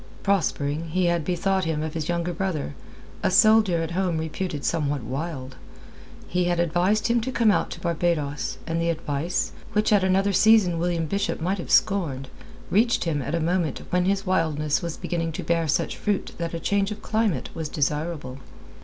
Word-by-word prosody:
Prospering, 165 -5 0
he 180 +3 +1
had 170 -2 +1
bethought 185 +2 0
him 155 -1 -1
of 155 -1 -4
his 160 -1 -3
younger 175 0 -1
brother, 165 - -2 0.5
a - - +2
soldier 200 -3 +5
at 165 - -4
home 180 -2 0
reputed 160 -1 -3
somewhat 145 -5 0
wild. 135 +1 -5 0.7
He 180 0 0
had 175 -1 +1
advised 175 +5 +2
him 235 0 +2
to 260 +4 -3
come 230 -3 +3
out - - +1
to - - -7
Barbados; 160 -6 -1
and 165 0 -1
the 170 - +1
advice, 160 0 -1 0.2
which 215 +1 +2
at 200 -2 +4
another 195 +2 +2
season 200 -4 +5
William 170 -1 0
Bishop 200 +5 -1
might 185 +4 -1
have - - -6
scorned, 150 -10 +2 0.4
reached 230 +4 +3
him 155 -4 -1
at 140 +5 -2
a - - 0
moment 165 -2 -1
when 180 0 +2
his 195 +1 0
wildness 155 -5 +1
was 170 -2 -4
beginning 165 -2 -2
to - - -4
bear 165 -1 +1
such 145 - 0
fruit 205 -2 -1
that 170 0 -3
a - - -3
change 200 +3 +1
of 210 0 -7
climate 220 -5 0
was 160 -2 -4
desirable. 150 -2 -2
170 Hz, 185 wpm, -25 LUFS, 155-190 Hz, 0.7 s, soldier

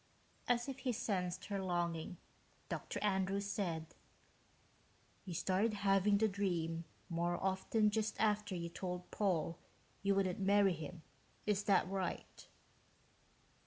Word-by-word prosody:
As 240 +1 +2
if 270 -1 -5
he 255 - 0
sensed 185 -5 -1
her 200 -2 -2
longing, 175 -2 -1 0.5
Dr. - - -3
Andrews 195 0 +1
said, 170 -6 -2 1.3
"You 180 -3 -5
started 190 +5 +2
having 200 0 +4
the 220 +2 +4
dream 170 -5 -1 0.2
more 175 0 0
often 195 +3 +2
just 220 0 -1
after 210 -2 +2
you 170 -1 -3
told 180 +1 -5
Paul 175 -5 0 0.4
you 200 0 +3
wouldn't 190 -2 +1
marry 200 0 +5
him, 160 +1 -7 0.4
is 205 -1 +1
that 200 - +4
right?" 190 -2 -4
190 Hz, 125 wpm, -37 LUFS, 175-205 Hz, 1.3 s, marry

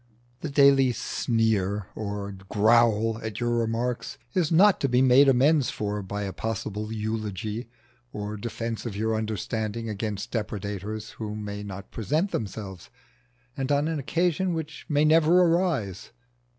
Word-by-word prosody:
The 155 - -4
daily 140 -2 +5
sneer 105 -4 0
or 100 -1 -4 0.2
growl 110 0 +3
at 110 -2 -5
your 120 -1 0
remarks 120 +3 -1 0.2
is 175 -4 +1
not 195 +4 +6
to 135 - +1
be 125 0 +3
made 130 +2 +6
amends 135 +2 +4
for 105 0 -3
by 100 +2 -4
a 95 -1 -4
possible 110 -1 -4
eulogy 110 +1 -3 0.4
or 105 0 -5
defence 115 +2 -4
of 105 - -5
your 110 +2 0
understanding 110 +1 -3
against 105 +1 -4
depredators 105 -1 -4
who 105 -2 -6
may 105 -1 -5
not 100 -1 -8
present 155 - -1
themselves, 100 -4 -5 0.7
and 135 0 -2
on 145 +1 +2
an 160 -2 -1
occasion 175 +4 0
which 160 -1 -6
may 150 0 +3
never 160 +3 +5
arise. 165 - +1
115 Hz, 140 wpm, -26 LUFS, 105-140 Hz, 0.7 s, not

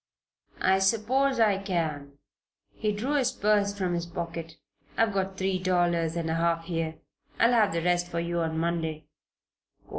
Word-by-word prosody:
"I 190 0 +4
suppose 235 +7 +2
I 210 -4 +4
can." 160 -7 -2 0.6
He 215 -1 -1
drew 230 +8 -2
his 260 -4 +2
purse 205 -1 +1
from 185 -3 -1
his 170 0 -2
pocket. 165 -1 -6 0.4
"I've 225 -2 +2
got 190 0 -2
three 190 -1 0
dollars 175 -3 +1
and 170 -1 -2
a 160 - 0
half 165 0 0
here. 165 -2 -2 0.4
I'll 235 +1 +5
have 220 -4 +4
the 165 0 -2
rest 175 0 +1
for 170 -1 -3
you 170 0 -2
on 160 -1 -1
Monday." 160 -2 -2
175 Hz, 160 wpm, -27 LUFS, 165-205 Hz, 0.6 s, I'll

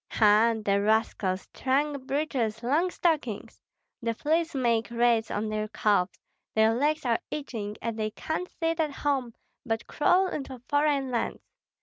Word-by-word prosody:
Ha! 220 +1 +4
the 200 0 +3
rascals, 205 -3 +1
trunk 275 0 0
breeches, 250 -6 -1
long 305 +9 +2
stockings! 305 - -1 0.4
The 230 -1 -1
fleas 325 +4 0
make 235 -3 +1
raids 235 -1 +2
on 210 +2 -2
their 215 0 -2
calves, 210 -3 +1 0.4
their 220 0 +4
legs 295 +4 0
are 235 -2 +2
itching, 225 -8 -5
and 230 -1 -3
they 215 0 0
can't 315 +10 -4
sit 330 0 -2
at 310 -2 +2
home, 270 -5 -1 0.3
but 225 -2 -2
crawl 360 +5 +3
into 270 -7 -4
foreign 290 -2 +1
lands. 235 - -2
240 Hz, 145 wpm, -28 LUFS, 220-295 Hz, 0.4 s, Ha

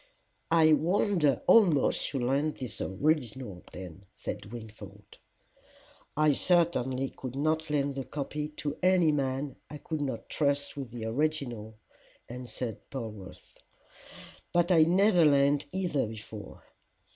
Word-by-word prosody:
"I 160 -1 +5
wonder 160 - +2
almost 175 -11 +4
you 135 -4 -1
lend 140 +4 +1
the 105 -6 -4
original 130 - 0
then," 90 +1 -10
said - - -6
Wingfold. 105 -3 -11 1.0
"I 155 -1 +4
certainly 135 -6 +1
could 130 -1 -7
not 155 +2 0
lend 145 -1 0
the 135 0 -4
copy 150 +2 -4
to 150 -1 -5
any 180 -3 +4
man 135 -1 -2
I 150 - -7
could 155 +1 -4
not 140 -2 -4
trust 140 -1 0
with 135 -4 -6
the 115 -1 -6
original," 120 -4 -2 0.5
answered 125 -2 -5
Polwarth. 110 -8 -9 0.9
"But 175 +1 +2
I 160 -3 +6
never 185 +1 +4
lent 140 -1 +4
either 180 -10 0
before." 110 -1 -9
140 Hz, 120 wpm, -29 LUFS, 120-155 Hz, 1.0 s, I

